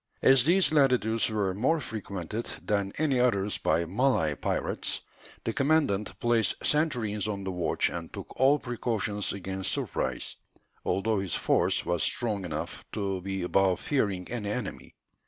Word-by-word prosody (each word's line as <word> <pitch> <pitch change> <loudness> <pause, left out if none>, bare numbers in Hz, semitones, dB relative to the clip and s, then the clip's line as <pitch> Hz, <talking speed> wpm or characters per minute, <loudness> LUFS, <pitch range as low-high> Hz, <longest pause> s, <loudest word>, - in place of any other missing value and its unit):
As 130 -2 +6
these 180 +2 +5
latitudes 120 -7 +3
were 105 -4 0
more 130 - +1
frequented 105 - -5 0.2
than 100 -2 0
any 140 -4 +2
others 105 -5 +1
by 85 - +1
Malay 95 - +2
pirates, - - -1 0.4
the 115 - -2
commandant 140 -8 +1
placed 115 -4 +1
sentries 120 -10 +1
on 100 -2 -3
the 95 - -3
watch 90 -3 +1
and 85 -1 -6
took - - -9
all 135 +3 +5
precautions 110 -5 -1
against 95 -1 -2
surprise, - - -2 0.5
although 105 +1 0
his 95 -4 -2
force - - +2
was 85 -1 0
strong 105 -6 0
enough 80 -2 -5
to 95 -3 -2
be 95 0 -3
above 95 0 +2
fearing 100 -10 -1
any 110 -4 -3
enemy. 110 0 -5
105 Hz, 145 wpm, -28 LUFS, 95-125 Hz, 0.5 s, As